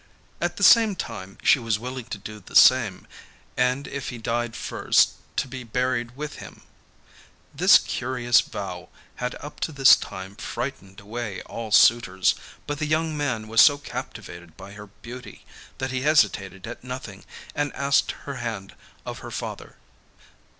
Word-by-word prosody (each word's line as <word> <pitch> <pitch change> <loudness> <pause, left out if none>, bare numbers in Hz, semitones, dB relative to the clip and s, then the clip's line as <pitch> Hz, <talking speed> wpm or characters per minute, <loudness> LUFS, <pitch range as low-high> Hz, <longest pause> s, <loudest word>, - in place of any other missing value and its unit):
At - - -1
the - - -2
same 225 -4 +7
time 95 - -7
she - - +5
was 115 -3 0
willing 125 +2 -6
to 105 - -6
do 105 +2 -9
the 95 - -14
same, 115 -8 +5 0.5
and 125 +2 +1
if 140 -2 -5
he 125 - -6
died 115 0 -2
first - - +2 0.3
to - - 0
be 130 0 -7
buried 125 +1 -2
with 150 +1 -6
him. - - -12 0.9
This - - +7
curious 120 -2 +1
vow - - -7 0.3
had 125 0 -3
up 145 - -9
to - - -2
this 135 -2 +7
time 95 +1 -8
frightened 100 -8 -6
away 105 -1 -5
all 115 -1 -7
suitors, 105 -4 +4 0.3
but 145 0 -4
the 150 - -1
young 155 +1 0
man 130 -7 -2
was 115 +1 +5
so 145 -1 +7
captivated 85 - -8
by 100 - -11
her 105 0 -11
beauty, 120 +5 -11 0.3
that 130 -1 -3
he 130 -1 -2
hesitated 100 - +2
at 120 +1 -8
nothing 125 -6 -7 0.3
and 145 -1 -1
asked 140 -1 +2
her 140 -2 -5
hand 105 -6 -5 0.3
of - - -6
her - - -8
father. - - -6
120 Hz, 160 wpm, -24 LUFS, 105-135 Hz, 0.9 s, same